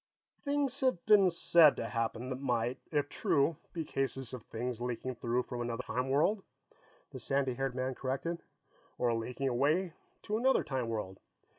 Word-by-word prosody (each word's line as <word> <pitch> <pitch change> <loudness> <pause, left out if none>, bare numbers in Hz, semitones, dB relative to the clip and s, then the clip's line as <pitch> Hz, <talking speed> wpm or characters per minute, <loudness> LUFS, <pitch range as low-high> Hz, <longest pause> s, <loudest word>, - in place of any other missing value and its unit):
"Things 280 -2 0
have 255 -10 +1
been 200 -3 +6
said 170 -3 +6
to - - -3
have - - -5
happened 115 +2 -2
that 130 - -3
might, 125 -1 0
if 145 -2 +1
true, 145 +2 +1
be 165 -2 -4
cases 135 -3 -2
of 125 - -5
things 120 +2 -4
leaking 125 +1 -3
through 120 +1 -1
from 120 -1 -5
another 120 +1 -3
time 125 +1 -2
world," 160 +10 +2 0.7
the - - -7
sandy 135 -2 0
haired 135 0 -2
man 130 +1 -1
corrected. 135 +7 -3 0.6
"Or 120 -1 +2
leaking 125 +4 -2
away 150 +8 +1 0.3
to 215 +1 -1
another 265 +2 +3
time 130 -4 -2
world." 105 -4 -4
130 Hz, 170 wpm, -32 LUFS, 120-165 Hz, 0.7 s, been